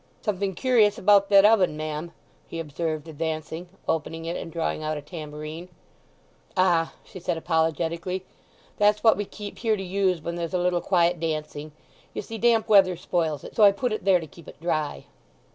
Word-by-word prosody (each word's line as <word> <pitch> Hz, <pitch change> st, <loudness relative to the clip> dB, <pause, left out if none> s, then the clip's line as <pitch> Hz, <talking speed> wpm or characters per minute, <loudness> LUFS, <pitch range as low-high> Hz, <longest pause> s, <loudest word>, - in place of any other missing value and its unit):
"Something 200 Hz, -3 st, -1 dB
curious 220 Hz, -5 st, +3 dB
about 200 Hz, 0 st, +4 dB
that 200 Hz, 0 st, +7 dB
oven, 195 Hz, -8 st, +4 dB
ma'am!" 155 Hz, +2 st, -4 dB, 0.4 s
he 165 Hz, -, -6 dB
observed 160 Hz, 0 st, -3 dB
advancing, 160 Hz, +2 st, -4 dB, 0.2 s
opening 165 Hz, 0 st, -2 dB
it, 170 Hz, +1 st, -3 dB
and 165 Hz, -, -6 dB
drawing 165 Hz, -2 st, -2 dB
out 155 Hz, 0 st, -2 dB
a -, -, -6 dB
tambourine. 155 Hz, +1 st, -8 dB, 0.9 s
"Ah," 175 Hz, -3 st, +2 dB
she 185 Hz, -, -11 dB
said 170 Hz, -, -2 dB
apologetically, 165 Hz, +3 st, -1 dB, 0.5 s
"that's 210 Hz, 0 st, +3 dB
what 225 Hz, -, +6 dB
we 205 Hz, -, -3 dB
keep 205 Hz, 0 st, -9 dB
here 220 Hz, -2 st, +1 dB
to 195 Hz, -, -5 dB
use 185 Hz, -1 st, 0 dB
when 170 Hz, +2 st, -5 dB
there's 170 Hz, +1 st, -3 dB
a -, -, +3 dB
little 175 Hz, 0 st, +1 dB
quiet 175 Hz, -2 st, +2 dB
dancing. 155 Hz, -2 st, -4 dB, 0.4 s
You -, -, -3 dB
see 225 Hz, +2 st, -7 dB
damp 230 Hz, -1 st, +3 dB
weather 190 Hz, -3 st, +5 dB
spoils 160 Hz, -4 st, -1 dB
it, -, -, -10 dB
so -, -, +1 dB
I 200 Hz, -, +9 dB
put 220 Hz, +4 st, -2 dB
it 215 Hz, -, -4 dB
there 190 Hz, -2 st, +4 dB
to 165 Hz, -, -7 dB
keep 160 Hz, +2 st, -16 dB
it -, -, -12 dB
dry." 155 Hz, -, -2 dB
170 Hz, 185 wpm, -25 LUFS, 160-195 Hz, 0.9 s, I